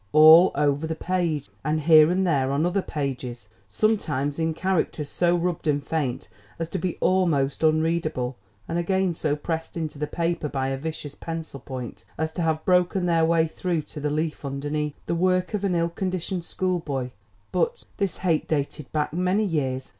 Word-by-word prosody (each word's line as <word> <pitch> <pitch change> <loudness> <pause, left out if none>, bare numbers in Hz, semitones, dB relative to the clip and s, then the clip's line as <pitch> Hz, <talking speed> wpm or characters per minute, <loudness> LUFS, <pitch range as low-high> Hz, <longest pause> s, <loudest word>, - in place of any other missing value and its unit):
all 160 +4 +9
over 145 +2 +1
the 160 - -2
page, 170 -5 -1 0.2
and 155 +1 0
here 155 0 +7
and 185 +2 +1
there 135 -6 +2
on 145 +4 +1
other 185 +3 +1
pages, 125 - -4 0.2
sometimes 145 - 0
in 160 0 +1
characters 160 -3 -1
so 175 +3 +2
rubbed 175 -1 -1
and 145 -1 +1
faint 140 -6 -2 0.3
as 165 - -3
to - - -3
be 180 +1 -2
almost 160 -8 +2
unreadable 155 -5 +1 0.3
and 170 - -1
again 190 +1 +1
so 155 -2 0
pressed 160 +3 -4
into 155 -3 -4
the 150 - -1
paper 170 -2 -1
by 135 -1 -1
a 135 - -1
vicious 150 0 -5
pencil 165 -3 -6
point 125 -7 -7
as 160 0 -1
to 175 - -4
have 160 -1 0
broken 180 0 +3
their 165 -2 +3
way 165 0 +3
through 165 0 -2
to 150 - -9
the 150 0 -1
leaf 155 +1 -2
underneath. 145 +2 -3
The - - -1
work 185 +3 +1
of 205 -1 -1
an 190 -3 +1
ill 170 0 +1
conditioned 185 0 -3
schoolboy! 160 -10 -2 0.4
but 485 0 0
this 200 -3 -1
hate 170 -5 0
dated 145 -1 -2
back 150 -1 -1
many 185 +5 +1
years. 135 -7 -1
160 Hz, 180 wpm, -25 LUFS, 145-175 Hz, 0.4 s, all